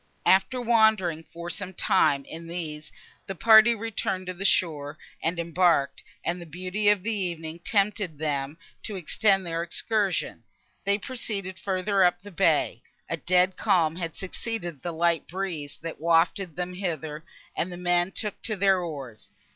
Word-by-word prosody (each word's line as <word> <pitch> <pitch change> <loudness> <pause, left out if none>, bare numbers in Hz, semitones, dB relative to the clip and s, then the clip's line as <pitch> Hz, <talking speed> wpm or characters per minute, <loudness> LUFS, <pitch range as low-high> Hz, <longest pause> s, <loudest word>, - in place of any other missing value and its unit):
After 195 +7 +4
wandering, 220 -9 +3
for 170 +1 -6
some 190 0 -6
time, 145 -9 +2
in 165 +1 -9
these, 155 -3 -6 0.4
the 195 - -4
party 220 +4 +7
returned 205 -4 -3
to 185 - -4
the 190 +2 -6
shore 155 -6 +1 0.2
and 165 +2 -1
embarked; 170 -3 +2 0.2
and, 175 +1 -1
the 170 - -9
beauty 185 +6 -1
of 205 -3 +3
the 225 +1 0
evening 170 -5 -3
tempting 200 -5 +1
them 145 -1 -2 0.2
to 210 - -5
extend 195 +2 +2
their 165 -1 -2
excursion, 200 +3 -1 0.4
they 200 0 +2
proceeded 200 -6 -5
further 190 +1 +1
up 175 0 +3
the 205 - -10
bay. 170 - +2 0.3
A - - 0
dead 180 +1 +2
calm 170 -6 +2
had 165 -2 -4
succeeded 185 - -5
the 175 - -3
light 170 0 +1
breeze, 170 -6 -4
that 165 -2 -6
wafted 170 +1 +2
them 180 +1 -3
hither, 160 -5 -3 0.3
and 180 - -2
the 175 - -7
men 175 +1 +2
took 210 +1 -4
to 220 - -1
their 195 -1 +3
oars. 140 - -7
180 Hz, 160 wpm, -26 LUFS, 165-200 Hz, 0.4 s, party